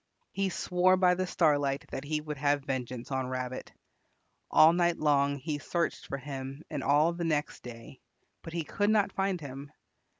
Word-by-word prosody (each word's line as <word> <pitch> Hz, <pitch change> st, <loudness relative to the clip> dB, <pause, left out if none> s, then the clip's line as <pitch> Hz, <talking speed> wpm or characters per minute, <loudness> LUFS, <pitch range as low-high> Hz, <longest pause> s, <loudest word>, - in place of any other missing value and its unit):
He 195 Hz, 0 st, 0 dB
swore 185 Hz, +1 st, +2 dB
by 180 Hz, -1 st, +4 dB
the 185 Hz, +1 st, -1 dB
Starlight 145 Hz, -5 st, +1 dB
that 135 Hz, -, -4 dB
he 150 Hz, +1 st, -2 dB
would 150 Hz, -1 st, -6 dB
have 145 Hz, 0 st, +1 dB
vengeance 130 Hz, -2 st, -4 dB
on 130 Hz, -1 st, -1 dB
Rabbit. 130 Hz, 0 st, -4 dB, 0.8 s
All 160 Hz, +2 st, +7 dB
night 175 Hz, -1 st, +2 dB
long 140 Hz, -2 st, +2 dB
he 145 Hz, +2 st, -4 dB
searched 170 Hz, +3 st, -2 dB
for 140 Hz, -, -3 dB
him 135 Hz, +1 st, -7 dB
and 145 Hz, -3 st, -3 dB
all 150 Hz, +4 st, +3 dB
the 170 Hz, 0 st, -4 dB
next 150 Hz, -3 st, -1 dB
day, 120 Hz, +2 st, -11 dB, 0.4 s
but 165 Hz, -, -9 dB
he 170 Hz, -1 st, -1 dB
could 205 Hz, +6 st, 0 dB
not 210 Hz, -2 st, +3 dB
find 195 Hz, -2 st, 0 dB
him. 140 Hz, -1 st, -8 dB
150 Hz, 175 wpm, -30 LUFS, 135-170 Hz, 0.8 s, All